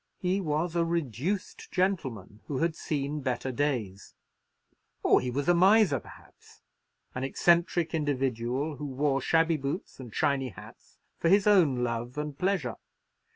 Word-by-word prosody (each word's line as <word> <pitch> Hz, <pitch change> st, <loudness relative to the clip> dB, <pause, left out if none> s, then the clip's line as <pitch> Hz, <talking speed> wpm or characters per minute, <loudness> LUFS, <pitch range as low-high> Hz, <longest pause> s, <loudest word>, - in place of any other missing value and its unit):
He 185 Hz, +2 st, 0 dB
was 160 Hz, +1 st, -1 dB
a 170 Hz, -, +3 dB
reduced 170 Hz, -, -3 dB
gentleman, 135 Hz, -, -1 dB
who 140 Hz, -, -3 dB
had 165 Hz, +2 st, 0 dB
seen 145 Hz, -1 st, -3 dB
better 130 Hz, 0 st, -2 dB
days; 120 Hz, -8 st, -2 dB, 0.9 s
or -, -, +5 dB
he 125 Hz, -, -3 dB
was 140 Hz, +3 st, -2 dB
a 175 Hz, -, +6 dB
miser, 190 Hz, -, +5 dB
perhaps—an 125 Hz, +3 st, -14 dB
eccentric 170 Hz, +3 st, +2 dB
individual, 135 Hz, -1 st, -1 dB
who 145 Hz, -, -5 dB
wore 135 Hz, 0 st, 0 dB
shabby 165 Hz, +1 st, +2 dB
boots 140 Hz, +4 st, -5 dB
and 125 Hz, -3 st, -9 dB
shiny 135 Hz, +2 st, 0 dB
hats 100 Hz, -, -14 dB, 0.2 s
for 165 Hz, -, +2 dB
his 195 Hz, +2 st, +5 dB
own 165 Hz, -12 st, +4 dB
love 120 Hz, +2 st, -3 dB
and 150 Hz, -1 st, -3 dB
pleasure. 180 Hz, -, -1 dB
145 Hz, 140 wpm, -28 LUFS, 130-170 Hz, 0.9 s, a